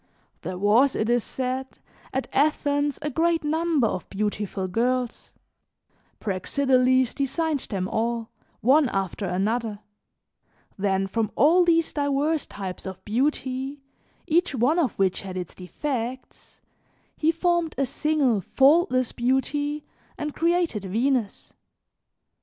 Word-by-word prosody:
There 185 - -5
was, 220 +8 +4
it 220 +2 0
is 240 -2 +2
said, 260 +1 -4 0.3
at 265 - -2
Athens 285 0 +1
a 300 - -2
great 330 +3 +1
number 315 -3 +1
of 185 -5 -3
beautiful 205 -1 -2
girls; 245 +5 -1 0.9
Praxiteles 255 +5 +2
designed 295 +2 -1
them 190 -3 -2
all, 230 +1 -2 0.3
one 270 +3 +4
after 195 0 -2
another; 210 +4 -1 1.0
then 195 -1 0
from 215 +2 -1
all 330 +8 +5
these 330 -1 +2
diverse 290 +1 0
types 190 -2 -6
of 190 0 -8
beauty, 265 +3 -1 0.4
each 335 -2 +1
one 260 +8 +2
of 300 -7 +1
which 190 -1 0
had 185 -2 -6
its 180 -2 -5
defects, 250 +6 -5 0.5
he 320 +1 +2
formed 340 -1 0
a 275 - +2
single 275 -6 +1
faultless 270 - +3
beauty 290 +4 -1 0.3
and 300 -1 -4
created 335 - +1
Venus. 230 +2 -1
260 Hz, 120 wpm, -25 LUFS, 210-295 Hz, 1.0 s, all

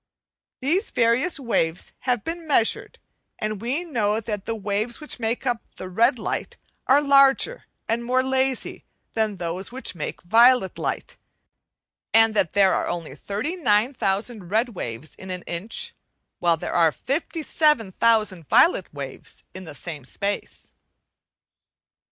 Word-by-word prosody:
These 340 - +1
various 245 +8 +2
waves 175 -10 -1 0.2
have 245 -4 +1
been 330 0 -5
measured, 235 -6 +1 0.4
and 215 -1 -3
we 265 +9 -1
know 220 -9 0
that 210 -3 -5
the 225 - -1
waves 210 +3 -2
which 300 -4 -4
make 230 +3 -2
up 240 -3 0 0.2
red 230 +8 +2
light - - -4 0.3
are 285 +3 +5
larger 280 - +4 0.2
and 230 +1 0
more 255 +2 +2
lazy 265 -1 -1 0.3
than 220 -2 0
those 180 +2 -5
which 260 +2 -4
make 165 0 -6
violet 230 +2 +5
light, - - -3 1.0
so 225 0 +7
that 205 -6 0
there 195 -2 +5
are - - 0
only 170 -5 -4
thirty 205 - -4
nine 245 - +2
thousand 200 -3 -2
red 225 +5 +2
waves 145 - -6
in 190 - -10
an 180 -1 -4
inch, 225 - -4 0.5
while 170 -1 +3
there - - -5
are 165 -2 +4
fifty 315 - -3
seven 300 -11 +2
thousand 210 -7 +2
violet 345 - +4
waves - - -8
in 185 0 -8
the 155 - -9
same 150 -1 -6
space. 200 +10 -4
225 Hz, 145 wpm, -24 LUFS, 190-260 Hz, 1.0 s, so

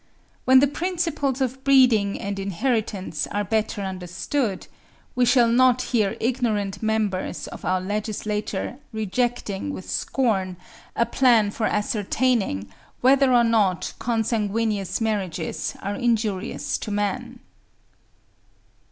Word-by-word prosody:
When 260 0 +7
the 285 - +5
principles 330 -4 -1
of 265 +1 -2
breeding 250 -7 +4
and 200 0 -4
inheritance 200 - -2
are 205 - -2
better 210 0 -1
understood, 190 +5 -3 0.5
we 250 0 +3
shall 245 -1 +5
not 255 +1 +4
hear 210 -5 +2
ignorant 215 -5 -1
members 215 -5 -1
of - - -10
our 185 +1 +1
legislature 210 +2 -3
rejecting 220 +2 -2
with 185 - -7
scorn 195 -8 0 0.4
a 235 - +2
plan 235 -4 +3
for 215 +1 -1
ascertaining 210 - 0 0.3
whether 265 +1 +5
or 240 -1 +5
not 210 -6 +1
consanguineous 220 -3 -1
marriages 195 -7 -2
are 200 - -2
injurious 220 -3 -1
to - - -6
man. 205 -1 -2
220 Hz, 110 wpm, -24 LUFS, 200-245 Hz, 0.5 s, When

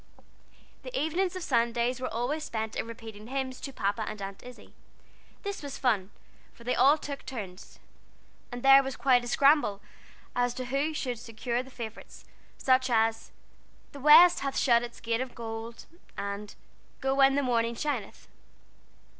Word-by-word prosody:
The - - -4
evenings 355 +4 0
of 370 - -5
Sunday 235 -1 +1
were 255 - -4
always 250 +7 -2
spent 220 -4 -4
in - - -3
repeating 225 -2 -10
hymns 260 0 -4
to 275 - -5
Papa 205 -3 -1
and 215 - -7
Aunt 195 0 -7
Izzie. 250 0 -13 0.7
This 400 0 -4
was 285 -2 -6
fun, 210 -7 +1 0.4
for 235 - -16
they 250 +1 0
all 275 +5 +5
took 285 -2 -7
turns, 195 -8 -8 0.7
and 245 0 -7
there 270 0 +8
was 270 -2 -5
quite 245 0 +3
a - - -6
scramble 275 -6 +3 0.6
as 245 0 +1
to 255 -1 -4
who 280 +5 -1
should 250 -5 -3
secure 235 +1 -3
the 260 - -12
favorites, 230 -4 -9 0.3
such 260 0 +2
as, 225 -1 +1 0.6
"The 285 - -10
west 310 +5 +8
hath 275 -1 -3
shut 235 -3 +4
its 240 0 -8
gate 230 +1 -1
of 260 -1 -6
gold," 230 0 -7 0.3
and 200 +1 -5 0.4
"Go 270 0 0
when 270 0 +5
the 285 - +1
morning 235 -2 +1
shineth." 250 -6 -4
245 Hz, 165 wpm, -29 LUFS, 230-275 Hz, 0.7 s, there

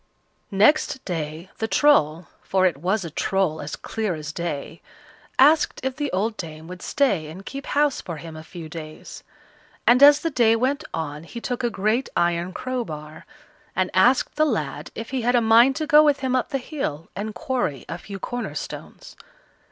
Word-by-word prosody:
Next 260 +6 +3
day 165 0 -4
the 220 - 0
Troll 175 - +3 0.2
for 190 -1 +1
it 175 -6 +2
was 185 +5 -1
a 165 - -6
Troll 190 -2 0
as 145 - -5
clear 215 -5 -3
as 155 -1 -6
day 165 -2 -5 0.6
asked 300 +3 +5
if 265 -1 -2
the 290 -1 -2
old 215 +4 -1
dame 160 -2 -7
would 180 0 -9
stay 200 - +1
and 185 +6 -10
keep 275 0 -7
house 290 -1 +1
for 170 -3 -6
him 160 0 -9
a 155 - -8
few 165 0 -9
days; 155 -1 -9 0.6
and 245 +2 +5
as 290 +1 +8
the 330 - -1
day 230 -4 +4
went 265 +5 0
on 150 -1 -4
he 235 +8 -8
took 245 +1 -3
a 240 - +2
great 220 +5 0
iron 170 +1 +1
crowbar, 160 -11 -5 0.5
and 185 -1 0
asked 245 +8 +3
the 305 - +4
lad 150 - -2
if 225 +2 -6
he 265 -2 -1
had 245 +2 +2
a - - +6
mind 235 +4 +5
to 310 - -2
go 300 -1 +7
with 290 -2 +2
him 260 -1 0
up 255 - 0
the 275 - -1
hill 245 - -4
and 210 +1 -4
quarry 245 - -2
a 165 - -5
few 200 +2 -8
corner 245 +5 -5
stones. - - -8
205 Hz, 190 wpm, -23 LUFS, 165-260 Hz, 0.6 s, as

